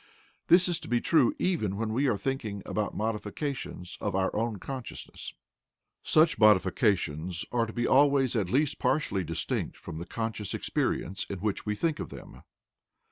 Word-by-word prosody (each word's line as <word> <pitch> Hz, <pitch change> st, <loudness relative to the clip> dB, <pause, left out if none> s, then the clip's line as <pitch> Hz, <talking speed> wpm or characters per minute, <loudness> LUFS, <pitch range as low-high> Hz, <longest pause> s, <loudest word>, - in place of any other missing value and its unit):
This 175 Hz, +2 st, +6 dB
is 175 Hz, -2 st, 0 dB
to -, -, -9 dB
be 120 Hz, 0 st, +2 dB
true 145 Hz, -2 st, +3 dB
even 110 Hz, -, 0 dB
when 110 Hz, 0 st, -2 dB
we 135 Hz, +5 st, +2 dB
are 115 Hz, -5 st, +2 dB
thinking 110 Hz, -6 st, -3 dB
about 105 Hz, -1 st, -2 dB
modifications 110 Hz, -, -4 dB
of -, -, -1 dB
our 95 Hz, 0 st, 0 dB
own 110 Hz, 0 st, -1 dB
consciousness; 130 Hz, +5 st, -7 dB, 0.7 s
such 160 Hz, +1 st, +4 dB
modifications 95 Hz, -, +2 dB
are 115 Hz, -1 st, +1 dB
to 110 Hz, -, -8 dB
be 120 Hz, 0 st, -1 dB
always 135 Hz, -2 st, +4 dB
at 100 Hz, -6 st, 0 dB
least 140 Hz, +5 st, +1 dB
partially 100 Hz, -11 st, +1 dB
distinct 80 Hz, 0 st, -2 dB
from 80 Hz, -, -7 dB
the 85 Hz, -, -7 dB
conscious 110 Hz, -3 st, -3 dB
experience 95 Hz, +3 st, -1 dB
in 100 Hz, -, -3 dB
which 105 Hz, +2 st, -2 dB
we 105 Hz, -, 0 dB
think 160 Hz, +7 st, 0 dB
of -, -, -4 dB
them. -, -, -11 dB
110 Hz, 165 wpm, -29 LUFS, 100-135 Hz, 0.7 s, This